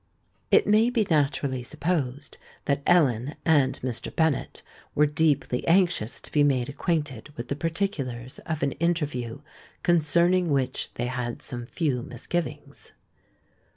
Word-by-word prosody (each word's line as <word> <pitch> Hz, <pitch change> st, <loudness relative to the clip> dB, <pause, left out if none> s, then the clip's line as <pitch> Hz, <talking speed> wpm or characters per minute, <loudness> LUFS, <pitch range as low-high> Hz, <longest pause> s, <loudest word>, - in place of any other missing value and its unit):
It -, -, +5 dB
may 215 Hz, +3 st, +4 dB
be 235 Hz, -4 st, +1 dB
naturally 140 Hz, -3 st, +1 dB
supposed 145 Hz, 0 st, -3 dB, 0.3 s
that 140 Hz, 0 st, +1 dB
Ellen 140 Hz, -6 st, +3 dB
and 145 Hz, -5 st, +3 dB
Mr. 125 Hz, -3 st, -3 dB
Bennet 160 Hz, -5 st, -1 dB, 0.3 s
were 150 Hz, -, +5 dB
deeply 150 Hz, -4 st, +1 dB
anxious 170 Hz, -, +2 dB
to -, -, -8 dB
be 150 Hz, -, +3 dB
made 135 Hz, -3 st, +2 dB
acquainted 150 Hz, -, -2 dB
with 120 Hz, +1 st, -6 dB
the 140 Hz, -, -1 dB
particulars 145 Hz, -, -3 dB
of 160 Hz, -3 st, -2 dB
an 140 Hz, -, +1 dB
interview 145 Hz, -8 st, -2 dB, 0.4 s
concerning 175 Hz, +2 st, +3 dB
which 135 Hz, -3 st, 0 dB
they 120 Hz, -, -2 dB
had 125 Hz, -1 st, -4 dB
some 120 Hz, -3 st, -5 dB
few 140 Hz, -5 st, -1 dB
misgivings. 160 Hz, +8 st, -5 dB
145 Hz, 130 wpm, -26 LUFS, 125-170 Hz, 0.4 s, It